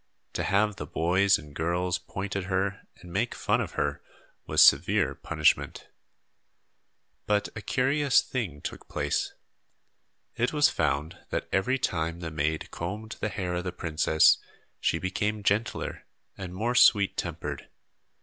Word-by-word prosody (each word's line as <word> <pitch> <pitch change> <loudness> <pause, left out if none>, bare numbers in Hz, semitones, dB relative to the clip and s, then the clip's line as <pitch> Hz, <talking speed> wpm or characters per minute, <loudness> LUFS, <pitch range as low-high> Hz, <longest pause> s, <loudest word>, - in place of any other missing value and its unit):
To - - -2
have 105 0 +1
the - - -6
boys 95 +4 +3
and 75 -2 -12
girls 90 +3 -1
point 95 +2 -6
at 100 -2 -2
her 95 +1 -2
and 90 -1 -12
make 115 +5 0
fun - - +1
of - - -5
her 70 0 -1 0.5
was - - +6
severe - - +4
punishment. 75 -2 0 1.4
But 105 -1 +1
a 105 - -5
curious 135 +5 +2
thing 95 - -4
took - - -7
place. 75 0 -1 1.0
It 120 +4 0
was 150 -1 +5
found 75 0 -1
that - - -2
every 110 +8 +2
time 85 -8 -2
the 80 -1 -5
maid 75 +1 -2
combed 105 +6 -5
the 105 - -1
hair 90 -4 -3
of 90 0 -2
the 90 - -3
princess 80 -2 +3 0.4
she - - +1
became 105 +4 -2
gentler 105 +2 -1 0.3
and 95 -2 -7
more 115 +5 0
sweet 105 -5 +5
tempered. - - -5
95 Hz, 145 wpm, -28 LUFS, 80-105 Hz, 1.4 s, was